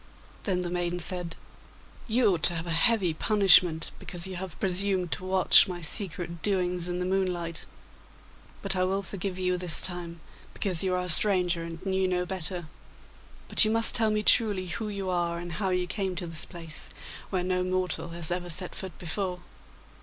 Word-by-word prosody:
Then 180 -3 0
the 175 - -4
maiden 175 0 -2
said, 175 -1 -2 0.7
'You 225 -3 +3
ought 170 - -3
to 175 - +2
have 165 0 -4
a 170 - -4
heavy 185 0 +2
punishment 180 -3 +4
because 175 -1 -4
you 190 -1 -1
have 185 -2 -7
presumed 190 -1 +1
to - - -3
watch 185 +1 +6
my 180 -2 -6
secret 170 0 -2
doings 180 -3 0
in 175 0 -3
the 180 - -2
moonlight. 180 -3 -2 1.0
But 195 -1 +1
I 185 - +1
will 195 +2 -1
forgive 190 0 -5
you 180 -1 0
this 175 -2 +1
time, 175 -2 -2 0.4
because 185 -5 -1
you 185 -1 0
are 180 - -1
a - - -6
stranger 180 -1 +4
and 165 +2 -8
knew 190 -1 +1
no 180 -1 -1
better. 180 -2 -5 0.8
But - - +5
you 215 - +2
must 225 +1 +3
tell 225 -1 +3
me 215 0 0
truly 205 -5 +5
who 215 +4 -4
you 200 -2 -5
are 170 -1 -1
and 175 0 -7
how 190 +3 -2
you 180 -1 0
came 185 +1 -3
to 175 - -4
this 165 -2 -4
place, 165 -3 -3 0.4
where 185 -2 -1
no 180 0 0
mortal 185 -1 -2
has 170 0 -3
ever 175 0 -2
set 180 +2 -3
foot 190 -4 -8
before. 180 +1 -4
180 Hz, 190 wpm, -27 LUFS, 175-190 Hz, 1.0 s, watch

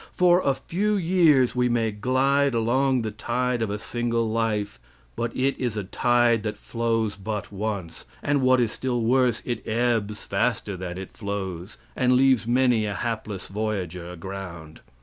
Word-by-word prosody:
For 180 0 +4
a 140 -5 +1
few 205 +9 -1
years 165 -9 +3
we 125 0 +2
may 115 -2 +1
glide 130 +5 +2
along 125 +2 +2
the 110 - -3
tide 120 +3 -1
of 110 - 0
a 105 - -2
single 115 +1 -1
life, 110 - -1 0.4
but 120 - -2
it 135 +1 +1
is 120 -4 -2
a 105 - -1
tide 120 +3 +2
that 105 -1 -4
flows 115 -2 -1
but 100 +1 -5
once, 100 -4 -4 0.2
and, 145 -1 +1
what 130 0 +4
is 115 -3 +1
still 125 -2 -2
worse, 125 -1 +2
it 120 -3 -3
ebbs 110 -2 0
faster 105 0 -1
than 90 -1 -6
it 95 - -7
flows, 100 -3 -5 0.2
and 125 -1 +3
leaves 130 -3 +4
many 120 -3 +3
a 100 - -3
hapless 105 -2 -4
voyager 95 -5 -3
aground. 90 -3 -8
115 Hz, 165 wpm, -25 LUFS, 105-125 Hz, 0.4 s, For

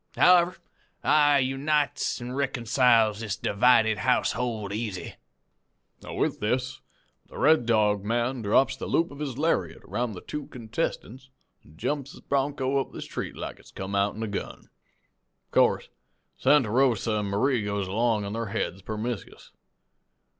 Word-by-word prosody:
However, 180 0 +5 0.5
I 145 -1 +5
unites 140 +3 0
an' 120 0 -6
reeconciles 125 -4 +2
this 110 -2 -3
divided 110 0 +3
household 115 -4 0
easy.' 105 -4 -4 0.9
"With - - -2
this 125 +4 -1 0.5
the - - -12
Red 150 -5 +4
Dog 105 -3 +2
man 120 +3 -1
drops 110 +6 +3
the - - -6
loop 165 +1 +1
of 140 - -11
his 140 -5 -4
lariat 160 +3 0
round 120 -3 -3
the 90 - -8
two 150 -1 -6
contestants 125 +1 -5 0.3
an' 80 - -19
jumps 140 - -3
his - - -14
bronco 140 -1 0
up - - -7
the - - -7
street - - -6
like - - -7
it's - - -17
come 95 +1 -6
outen 100 +2 0
a - - -2
gun. 100 - -6 0.7
Of - - -47
course - - +3 0.5
Santa 130 -8 +3
Rosa 120 -3 +2
an' 105 - -1
Marie 110 +4 +1
goes 100 -1 -2
along 110 +1 +1
on 100 - -5
their 115 0 -3
heads 100 -2 -3
permiscus. 110 +2 -6
120 Hz, 145 wpm, -26 LUFS, 105-135 Hz, 0.9 s, However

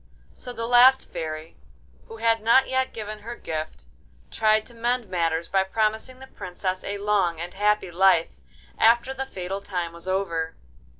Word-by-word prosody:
So 250 - -9
the 230 -1 -4
last 250 +2 +5
Fairy, 155 0 -6 0.5
who 450 - -10
had 225 - +2
not 235 +4 +5
yet 260 0 0
given 215 -1 -6
her 230 +3 -7
gift, 155 -5 -6 0.5
tried 215 -1 +2
to 240 - -12
mend 240 0 -1
matters 165 -2 0
by 195 - +2
promising 220 +5 -1
the 265 - -11
Princess 185 -5 -5
a 200 0 -4
long 200 -5 +1
and 175 +1 -5
happy 210 -2 +1
life 180 -1 +3 0.5
after 235 +3 +4
the 265 0 -4
fatal 190 -2 -5
time 175 -4 -4
was 170 +2 -12
over. 170 -4 -1
205 Hz, 165 wpm, -25 LUFS, 175-235 Hz, 0.5 s, last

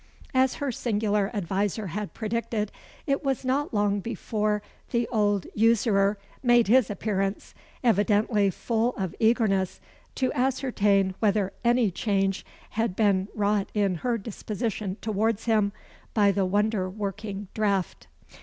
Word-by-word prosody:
As 260 0 +3
her 280 -2 -2
singular 210 -3 0
adviser 205 +1 -1
had 210 -1 -4
predicted, 220 -1 -2 0.3
it 275 0 0
was 270 -2 -1
not 275 +3 0
long 205 -1 +1
before 210 -1 -2 0.3
the 235 -1 0
old 205 -4 +1
usurer 210 -2 +3 0.2
made 240 -3 +4
his 250 +1 +5
appearance, 195 -1 -2 0.3
evidently 210 -1 +3
full 230 +5 -1
of 190 -4 -2
eagerness 220 -5 +2 0.4
to 260 -1 0
ascertain 210 -7 +1
whether 205 -3 +1
any 235 -3 +3
change 195 0 0 0.3
had 225 -4 -1
been 195 -3 +2
wrought 205 -1 +1
in 200 -3 +2
her 240 -2 0
disposition 210 -1 -4
towards 220 0 0
him 215 -3 +2 0.4
by 205 -2 +5
the 195 -1 +1
wonder 205 -1 +1
working 205 0 -5
draught. 200 -4 -1
210 Hz, 125 wpm, -26 LUFS, 200-230 Hz, 0.4 s, his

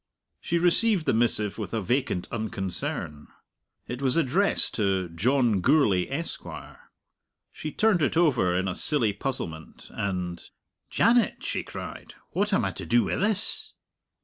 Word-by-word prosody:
She 170 - -1
received 180 +2 +3
the - - +2
missive 110 -2 +2
with 110 +1 -4
a - - 0
vacant 120 -3 -1
unconcern. 95 -8 -4 0.6
It 125 +2 -6
was 135 +2 +2
addressed 165 +7 +2
to 95 -4 0
"John 115 +4 +1
Gourlay, 100 - +3
Esquire." 165 +5 -7 0.6
She 155 - -6
turned 210 -3 +2
it 150 - +1
over 125 - +3
in 95 +1 -1
a 95 - -1
silly 120 -6 +1
puzzlement, 100 - -5
and, 90 -3 -3 0.5
"Janet!" 235 +1 +2
she - - -2
cried, - - -9 0.2
"what 205 +3 0
am 195 - +2
I - - -1
to - - -8
do 120 0 +3
wi' - - -2
this?" 205 +1 +1
120 Hz, 145 wpm, -26 LUFS, -, 0.6 s, received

